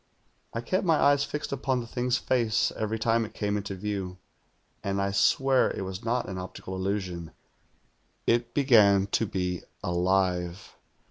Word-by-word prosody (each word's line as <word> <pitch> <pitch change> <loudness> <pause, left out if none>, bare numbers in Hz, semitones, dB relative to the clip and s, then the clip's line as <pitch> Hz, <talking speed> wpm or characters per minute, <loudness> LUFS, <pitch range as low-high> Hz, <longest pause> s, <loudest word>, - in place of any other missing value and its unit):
I 115 - -3
kept 185 +10 0
my 165 -4 +4
eyes 145 -1 +4
fixed 150 +1 -4
upon 130 -1 0
the 120 - -5
thing's 125 +2 0
face 115 -5 +1
every 110 +1 -2
time 115 +1 +2
it 110 0 -8
came 105 -1 -1
into 100 -1 -3
view, 95 -2 -4 0.7
and 100 0 -1
I 100 0 0
swear 135 +6 +3
it - - -4
was 95 +3 -6
not 120 +2 0
an 95 0 -5
optical 95 0 -7
illusion 95 -3 -3 0.5
— - - -42
it 120 +1 -5
begem 105 -8 +5
to 115 - +1
be 90 -2 -2 0.2
alive. 90 0 0
105 Hz, 160 wpm, -28 LUFS, 95-120 Hz, 0.7 s, begem